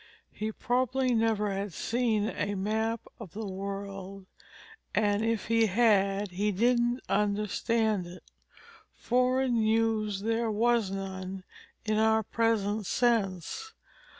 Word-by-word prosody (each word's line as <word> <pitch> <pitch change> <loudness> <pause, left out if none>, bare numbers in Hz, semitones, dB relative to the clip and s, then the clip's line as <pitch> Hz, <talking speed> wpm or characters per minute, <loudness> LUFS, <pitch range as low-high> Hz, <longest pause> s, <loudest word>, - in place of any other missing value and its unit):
He 215 +1 -4
probably 255 +3 0
never 220 -2 +1
had 195 -1 -3
seen 225 -2 0
a 205 -4 -2
map 220 +3 -1 0.2
of 200 -8 -10
the 220 +1 -5
world, 195 0 -6 0.7
and 205 0 +2
if 225 -2 0
he 230 0 +3
had, 200 -2 +2
he 205 +4 0
didn't 240 +4 +2
understand 210 0 0
it. 180 +1 -11 0.7
Foreign 255 0 +1
news 220 -2 +1
there 225 +1 0
was 225 -1 +2
none, 190 -1 -5 0.4
in 215 0 +1
our 220 0 +3
present 215 -2 0
sense. 235 - 0
215 Hz, 115 wpm, -29 LUFS, 195-230 Hz, 0.7 s, he